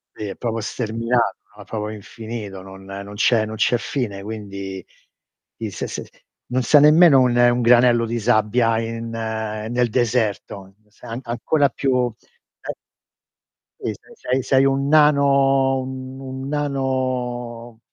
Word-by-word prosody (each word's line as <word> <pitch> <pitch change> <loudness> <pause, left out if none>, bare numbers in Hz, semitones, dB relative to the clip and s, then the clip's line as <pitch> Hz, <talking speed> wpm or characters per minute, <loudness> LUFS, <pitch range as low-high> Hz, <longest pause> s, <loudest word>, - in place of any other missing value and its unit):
Lì 105 - -5
è - - -5
proprio 115 -2 -3
sterminato, 115 +1 -1 0.2
no, 105 - -11
è - - -13
proprio 110 0 -4
infinito, 105 -2 -8
non 95 0 -12
non 100 +1 -8
c'è 110 +1 +3
non 110 - -6
c'è 120 +2 +2
fine 105 -4 -4
quindi 100 -3 -7 0.7
i - - -4
se - - -5
se - - -6 0.4
non 130 0 +1
sei 145 +5 +5
nemmeno 150 -2 +7
un, 125 -1 +2
un 120 0 +4
granello 120 0 +5
di 120 +1 -2
sabbia 115 0 +2
in 115 0 -5
nel 110 +1 -2
deserto, 110 -5 -1
sei 115 +2 -8
ancora 140 +5 +1
più 125 -2 0 0.5
eh - - -5 1.1
Sì, - - -2
sei - - -19
sei 130 +1 -1
sei 135 +1 +3
un 135 +1 +1
nano 140 -3 +4
un 130 +1 -6
nano 130 -5 -3
120 Hz, 135 wpm, -21 LUFS, 110-130 Hz, 1.1 s, nemmeno